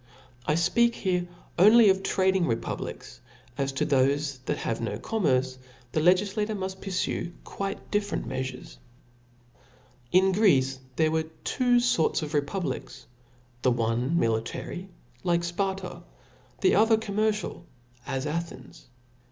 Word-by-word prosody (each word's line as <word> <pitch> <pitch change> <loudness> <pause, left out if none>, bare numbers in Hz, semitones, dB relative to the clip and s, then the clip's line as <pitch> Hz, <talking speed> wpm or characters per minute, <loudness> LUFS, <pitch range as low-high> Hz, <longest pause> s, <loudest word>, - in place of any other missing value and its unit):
I 150 - +3
fpeatc 230 +8 +3
here 180 -2 -1 0.3
only 215 +4 +8
of 190 0 +3
trading 190 -2 +2
republics, 115 0 -4 0.3
for 140 - -3
as 135 0 0
to 135 - 0
thofe 140 0 +1
that 150 - -1
have 115 - -3
no 115 - -2
commerce, 130 - 0 0.3
the 155 - 0
legiQator 200 +5 +2
muft 190 0 -5
purfue 180 -2 -2
quite 195 0 -5
different 205 -1 -1
meafures 130 -1 -5 0.7
*. 125 +1 -31
In 190 +1 +5
Greece 135 -10 +3 0.2
there 155 +1 +2
were 160 0 -1
two 245 -2 +2
forts 205 -10 +2
of 150 +1 -5
republics: 145 -3 -3 0.6
the 130 - +3
one 120 +5 0
military, 115 +10 -2 0.3
like 170 -1 +1
Sparta 190 +2 -2
^ - - -12 0.6
the 380 - +4
other 220 +1 +5
commercial^ 215 -3 -1 0.4
ts 135 +1 -2
Athens. 160 -3 -6
170 Hz, 130 wpm, -27 LUFS, 130-195 Hz, 0.7 s, only